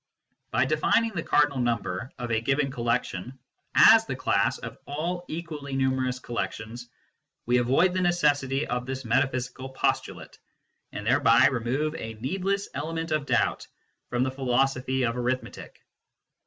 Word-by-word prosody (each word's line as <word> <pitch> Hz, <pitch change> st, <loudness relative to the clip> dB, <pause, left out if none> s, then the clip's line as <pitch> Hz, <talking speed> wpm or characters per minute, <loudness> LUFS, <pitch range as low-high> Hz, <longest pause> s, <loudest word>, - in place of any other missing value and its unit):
By -, -, +2 dB
defining 230 Hz, 0 st, +2 dB
the 175 Hz, -5 st, -3 dB
cardinal 145 Hz, -3 st, +2 dB
number 120 Hz, -1 st, -2 dB
of 120 Hz, -2 st, -5 dB
a 110 Hz, 0 st, +1 dB
given 135 Hz, +3 st, 0 dB
collection 120 Hz, -2 st, -2 dB, 0.4 s
as -, -, +8 dB
the -, -, -3 dB
class -, -, +1 dB
of -, -, -9 dB
all 170 Hz, +5 st, -3 dB
equally 155 Hz, -4 st, -6 dB
numerous 130 Hz, -1 st, 0 dB
collections, 120 Hz, -1 st, -5 dB, 0.6 s
we 125 Hz, +1 st, +3 dB
avoid 135 Hz, +10 st, +3 dB
the 185 Hz, -, 0 dB
necessity 145 Hz, -5 st, +1 dB
of 125 Hz, 0 st, -3 dB
this 130 Hz, 0 st, -5 dB
metaphysical 130 Hz, +2 st, -1 dB
postulate, 130 Hz, -, -2 dB, 0.5 s
and 105 Hz, -, -6 dB
thereby 120 Hz, 0 st, +5 dB
remove 135 Hz, +4 st, 0 dB
a 115 Hz, -7 st, -6 dB
needless 195 Hz, -, -2 dB
element 165 Hz, +3 st, -4 dB
of 150 Hz, -2 st, 0 dB
doubt -, -, +1 dB, 0.4 s
from 120 Hz, 0 st, 0 dB
the 130 Hz, -, -1 dB
philosophy 130 Hz, 0 st, 0 dB
of 115 Hz, -1 st, +1 dB
arith 125 Hz, +1 st, -1 dB
metic. -, -, -11 dB
130 Hz, 140 wpm, -26 LUFS, 120-150 Hz, 0.6 s, as